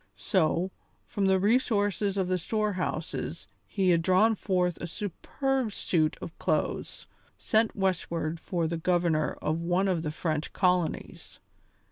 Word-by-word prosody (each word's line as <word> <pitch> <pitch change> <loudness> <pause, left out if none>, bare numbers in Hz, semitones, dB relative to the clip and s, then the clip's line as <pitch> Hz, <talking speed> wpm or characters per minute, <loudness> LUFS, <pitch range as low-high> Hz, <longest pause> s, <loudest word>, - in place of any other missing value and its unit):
So, 180 -1 +1 0.3
from 200 -4 -1
the 190 0 +4
resources 205 -2 +1
of 190 -2 +1
the 185 0 0
storehouses 180 -5 -2 0.2
he 190 -3 +2
had 170 -1 +3
drawn 185 +6 +4
forth 180 -4 0
a 170 - -3
superb 240 - -2
suit 160 -5 +1
of 165 - -8
clothes - - -1 0.3
sent 220 0 +1
westward 170 -4 -1
for 170 0 -2
the 165 +1 -1
governor 170 -2 +1
of 155 +2 0
one 180 +3 +1
of 180 -4 +1
the 155 - -2
French 155 0 -2
colonies. 180 -2 -1
180 Hz, 135 wpm, -28 LUFS, 165-200 Hz, 0.3 s, the